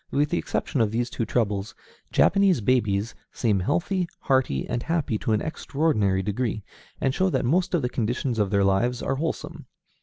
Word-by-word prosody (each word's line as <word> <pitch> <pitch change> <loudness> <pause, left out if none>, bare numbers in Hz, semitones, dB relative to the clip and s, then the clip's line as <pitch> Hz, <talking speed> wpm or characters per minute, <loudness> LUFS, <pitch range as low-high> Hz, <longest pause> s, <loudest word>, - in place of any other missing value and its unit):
With 145 +2 +1
the - - +1
exception 130 - -1
of 110 - +2
these 120 +3 -2
two 115 - -2
troubles, 105 -3 -1 0.4
Japanese 195 -5 +4
babies 110 -2 +1 0.2
seem 105 -5 +1
healthy, 175 - 0
hearty, 130 - +1
and 120 - -2
happy 150 -9 -1
to - - -2
an 110 - +1
extraordinary 135 -12 0
degree, 110 +1 -2 0.4
and 130 - +1
show 190 +4 +2
that 150 - 0
most 180 +7 +2
of 160 - 0
the - - +2
conditions 120 0 -2
of 105 -2 +2
their 100 -1 +2
lives 115 +6 +1
are 135 - -1
wholesome. 160 +3 -4
120 Hz, 180 wpm, -25 LUFS, 105-150 Hz, 0.4 s, Japanese